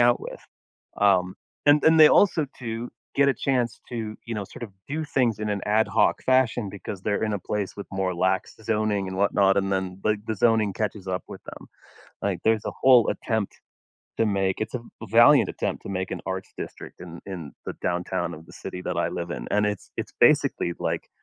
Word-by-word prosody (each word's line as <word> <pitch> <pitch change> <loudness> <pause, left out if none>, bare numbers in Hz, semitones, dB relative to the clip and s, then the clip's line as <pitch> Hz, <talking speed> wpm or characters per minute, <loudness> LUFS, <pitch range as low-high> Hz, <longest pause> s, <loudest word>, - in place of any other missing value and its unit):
out 120 0 +4
with. - - -8 0.6
Um. 95 -2 +3 0.3
And 145 +1 +5
and 160 0 +6
they 155 - +10
also, 165 -7 +4
too, 115 -1 -5 0.2
get 140 0 +4
a 135 - +3
chance 120 -2 -1
to, 110 -3 -4
you 115 -1 -5
know, 105 - -3
sort 110 - -12
of 115 - -6 0.2
do 155 +3 -2
things 125 -7 +1
in 105 0 -2
an 100 -1 -1
ad 105 +1 +3
hoc 105 +3 +2
fashion 125 -5 +2
because 100 -1 -7
they're 105 +1 0
in 105 -1 0
a - - -1
place 100 +1 -3
with 100 - -7
more 95 -1 -1
lax 95 +2 0
zoning 105 -2 0
and 95 - -5
whatnot, 100 -1 +3
and 95 0 0
then, 95 0 -2
like, 105 -1 +1
the 110 - -1
zoning 110 -1 +2
catches 105 -1 -3
up 95 0 -2
with - - -10
them. - - -11 0.5
Like, - - -1
there's 110 -1 +2
a - - -2
whole 125 -3 +6
attempt 110 -3 -2 0.6
to 115 - +3
make 95 -2 +1
it's 110 +3 -3
a - - -2 0.2
a 115 - -7
valiant 120 +6 +6
attempt - - -3
to - - -7
make 95 -1 -3
an - - -3
arts 95 0 -4
district - - -8
in 85 -1 -9
in 90 -7 -7
the - - -4
downtown 90 -1 -1
of 80 0 -11
the - - -15
city 90 - -7
that - - -3
I - - +1
live 85 0 -4
in. - - -5
And 105 0 +3
it's 105 -2 -4
it's - - -4
basically, 85 - +4
like - - -2
105 Hz, 215 wpm, -25 LUFS, 95-115 Hz, 0.6 s, they